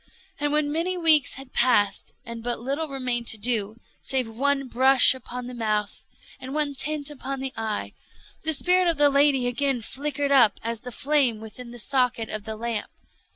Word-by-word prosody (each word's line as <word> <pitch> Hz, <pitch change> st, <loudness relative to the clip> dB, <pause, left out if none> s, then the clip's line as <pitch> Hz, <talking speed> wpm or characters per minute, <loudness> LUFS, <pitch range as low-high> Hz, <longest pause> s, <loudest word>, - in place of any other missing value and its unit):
And 290 Hz, 0 st, -1 dB
when 300 Hz, -1 st, 0 dB
many 345 Hz, +4 st, -1 dB
weeks 315 Hz, -5 st, +5 dB
had 270 Hz, -1 st, -10 dB
passed, 210 Hz, -5 st, +2 dB
and 235 Hz, 0 st, -8 dB
but 240 Hz, 0 st, -3 dB
little 280 Hz, +7 st, -3 dB
remained 250 Hz, -4 st, -3 dB
to 220 Hz, -, +2 dB
do, 215 Hz, -1 st, -1 dB, 0.3 s
save 260 Hz, -2 st, -2 dB
one 275 Hz, +4 st, -1 dB
brush 260 Hz, +2 st, +6 dB
upon 250 Hz, -1 st, -8 dB
the 250 Hz, -, -8 dB
mouth 215 Hz, -3 st, -3 dB, 0.3 s
and 260 Hz, +2 st, -7 dB
one 300 Hz, -2 st, 0 dB
tint 295 Hz, +2 st, -2 dB
upon 275 Hz, -1 st, -6 dB
the 265 Hz, 0 st, -5 dB
eye, 220 Hz, -2 st, -4 dB, 0.5 s
the 315 Hz, -, +2 dB
spirit 360 Hz, +4 st, +2 dB
of 335 Hz, -3 st, +1 dB
the 290 Hz, 0 st, +4 dB
lady 280 Hz, -2 st, +3 dB
again 245 Hz, 0 st, -1 dB
flickered 285 Hz, +3 st, -3 dB
up 240 Hz, -7 st, +5 dB
as 230 Hz, 0 st, -3 dB
the 250 Hz, -, -9 dB
flame 265 Hz, -4 st, +1 dB
within 225 Hz, +3 st, -10 dB
the 240 Hz, -, -10 dB
socket 250 Hz, -2 st, 0 dB
of 215 Hz, -1 st, -5 dB
the 220 Hz, -1 st, -5 dB
lamp. 230 Hz, -1 st, -4 dB
260 Hz, 185 wpm, -24 LUFS, 235-285 Hz, 0.5 s, brush